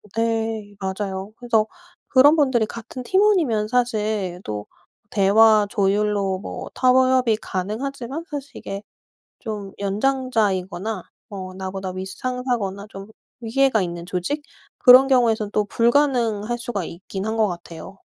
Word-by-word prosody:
네 225 -2 -1
맞아요. 190 +1 -4
그래서 230 -3 +1 0.4
그런 285 +4 +6
분들이 260 -7 +2
같은 235 +3 -8
팀원이면 345 - +2
사실 215 -6 -1
또 105 -1 -5 0.4
대화 210 +1 +5
조율로 200 -2 +1
뭐 - - -7
타협이 255 -2 +4
가능하지만 245 - -4
사실 285 -2 -6
이게 195 +1 -6 0.6
좀 210 -4 -6
연장자이거나 210 -3 -1 0.3
뭐 185 -2 -7
나보다 190 0 -5
윗 185 +1 -5
상사거나 240 -4 -3
좀 195 0 -9 0.3
위계가 235 -1 +2
있는 170 -1 -4
조직 185 - -2 0.4
그런 255 +1 +8
경우에선 225 -5 +2
또 210 -1 +1
불가능할 240 -2 +1
수가 235 -6 -3
있긴 190 +3 -6
한 220 +1 -2
것 215 -1 +3
같아요. 170 +1 -8
215 Hz, 275 characters per minute, -22 LUFS, 195-250 Hz, 0.6 s, 그런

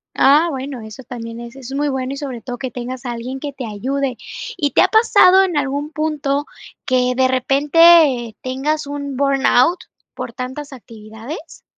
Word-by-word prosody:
Ah, 300 +5 +5
bueno, 265 -3 -5
eso 220 +4 -10
también 230 -2 -8
es 235 +1 -9
es 270 0 -9
muy 290 +1 0
bueno 265 0 -3
y 275 - -6
sobre 260 -5 -6
todo 245 0 -6
que 260 0 -4
tengas 255 +1 -6
a 240 - -2
alguien 245 +3 -5
que 285 0 -6
te 265 -2 -6
ayude. 255 +4 -3 0.4
¿Y 290 -3 0
te - - +4
ha - - +5
pasado 385 -4 +6
en 360 -4 -1
algún 285 +2 -2
punto 295 -2 -1 0.4
que 250 -1 +2
de 260 0 +3
repente 275 -1 +4
tengas 280 +3 -2
un 285 -1 -5
burnout 275 +3 +3 0.3
por - - -7
tantas 270 +3 -6
actividades? 225 +6 -10
270 Hz, 175 wpm, -19 LUFS, 250-290 Hz, 0.4 s, pasado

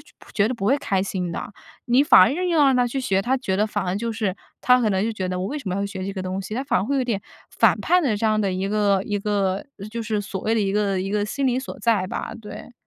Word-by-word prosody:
就 - - -19
不 - - -17
觉 210 +1 +2
得 255 - -2
不 195 - -5
会 270 - +4
开 195 -8 0
心 185 -2 -3
的。 200 - -6 0.3
你 245 +3 +4
反 290 - +7
而 190 - +4
硬 360 +3 -1
要 320 -4 +4
让 270 -2 +4
他 245 -1 +3
去 270 +3 -3
学， 195 -6 +1
他 260 +4 +1
觉 220 -7 -2
得 210 +2 +2
反 205 -2 -3
而 180 - -1
就 230 +2 -2
是 210 -4 -1 0.3
他 250 0 +5
可 230 - +2
能 190 -1 +1
就 225 - -1
觉 190 -3 -3
得 180 0 -2
我 185 - -2
为 295 +6 -3
什 240 - -6
么 185 - -1
要 200 - -1
学 190 -2 -6
这 195 - -4
个 190 - -4
东 185 +1 -3
西， 200 +3 -6
他 260 +4 -2
反 - - +1
而 - - -2
会 280 +4 -1
有 260 - +1
点 220 -5 -1 0.3
反 - - +3
叛 360 0 +3
的 240 -8 +1
这 225 - -3
样 215 0 +2
的 200 -2 0
一 185 +1 -2
个 205 -2 +2
一 205 - -2
个 200 -2 -1
呃 200 - -7
就 230 +2 -5
是 215 -2 -1
所 195 -1 -5
谓 225 - 0
的 225 - +2
一 195 -1 0
个 200 -2 +1
一 195 - -3
个 205 0 0
心 275 +5 -2
理 250 - +1
所 265 - -7
在 225 -5 +2
吧， - - -4
对。 210 +3 -10
210 Hz, 340 characters per minute, -23 LUFS, 195-245 Hz, 0.3 s, 反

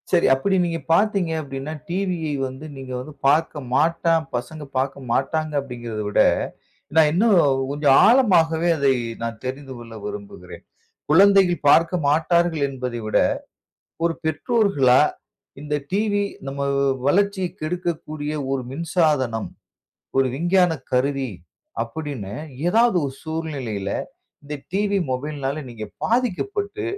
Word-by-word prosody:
சரி. 175 -2 +3
அப்பிடி 190 +9 +1
நீங்க 165 -1 -2
பார்த்தீங்க 195 -2 +2
அப்டின்னா, 135 +1 -6 0.2
டிவியை 175 -4 -1
வந்து 130 +4 -9
நீங்க 130 -1 -8
வந்து 150 +4 -8
பார்க்க 150 +1 +2
மாட்டான், 165 +2 +2
பசங்க 150 +5 -5
பார்க்க 135 0 -2
மாட்டாங்க 155 +5 0
அப்பிடிங்கிறதவிட, 120 -6 -2 0.7
நான் 160 -2 +6
இன்னும் 210 +7 +3 0.4
கொஞ்சம் 145 -1 +4
ஆழமாகவே 175 -9 +4
அதை 140 -2 +3 0.3
நான் 115 -1 -4
தெரிந்து 135 +1 -5
கொள்ள 115 -1 -11
விரும்புகிறேன். 205 -1 -8 0.5
குழந்தைகள் 185 0 +5
பார்க்க 165 +4 +5
மாட்டார்கள் 160 +1 +2
என்பதைவிட, 125 -5 -2 0.9
ஒரு 170 -1 +2
பெற்றோர்களா 160 - +3 0.6
இந்த 150 0 -3 0.2
டிவி 205 0 +1 0.2
நம்ம 140 +1 -4 0.5
வளர்ச்சிய 200 +3 +2 0.2
கெடுக்கக்கூடிய 155 -2 -3 0.2
ஒரு 135 -1 -1
மின்சாதனம். 150 - 0 0.7
ஒரு 135 0 +4
விஞ்ஞான 175 +3 +3 0.2
கருவி. 135 0 +1 0.5
அப்பிடின்னு 120 -5 -6 0.3
ஏதாவது 230 +1 +4
ஒரு 135 - -3
சூழ்நிலையில் 135 -12 -4 0.5
இந்த 145 +1 -5 0.2
டிவி, 200 +1 +1
மொபைல்னால 140 +2 -3
நீங்க 115 -3 -7 0.2
பாதிக்கப்பட்டு, 400 - -1
155 Hz, 110 wpm, -22 LUFS, 135-180 Hz, 0.9 s, நான்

